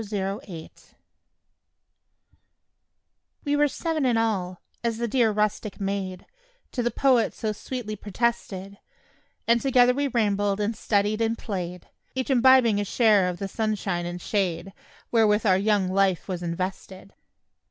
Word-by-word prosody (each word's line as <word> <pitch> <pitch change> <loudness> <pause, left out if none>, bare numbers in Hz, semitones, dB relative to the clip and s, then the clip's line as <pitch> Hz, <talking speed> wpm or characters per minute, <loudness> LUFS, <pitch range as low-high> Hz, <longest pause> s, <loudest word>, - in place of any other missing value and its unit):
BOYS 215 -1 -10
AND 195 0 -2
GIRLS 165 -5 -12 2.5
We 290 0 +1
were 295 0 +4
"seven 320 +1 -2
in 245 -3 +2
all," 190 -6 -1 0.2
as 230 -1 -1
the 235 +1 -1
dear 235 0 +3
rustic 210 0 -1
maid 195 -2 -3 0.5
To 250 - -2
the 240 - +1
poet 245 0 +2
so 220 - -2
sweetly 215 0 -5
protested; 200 -2 -3 0.7
And 235 0 +4
together 250 -2 +4
we 285 +2 0
rambled 205 -4 0
and 210 +2 -1
studied 210 +1 0
and 225 0 0
played, 180 -4 -5 0.3
Each 260 +1 -2
imbibing 250 -4 +5
a - - 0
share 205 -3 +3
of 180 - -5
the 195 - -4
sunshine 195 -5 -2
and 175 0 -5
shade 190 -1 -2 0.4
Wherewith 220 -2 +3
our 190 -2 +4
young 205 -2 +2
life 190 -1 +1
was 180 -3 -4
invested. 185 +2 -5
210 Hz, 140 wpm, -25 LUFS, 190-235 Hz, 2.5 s, imbibing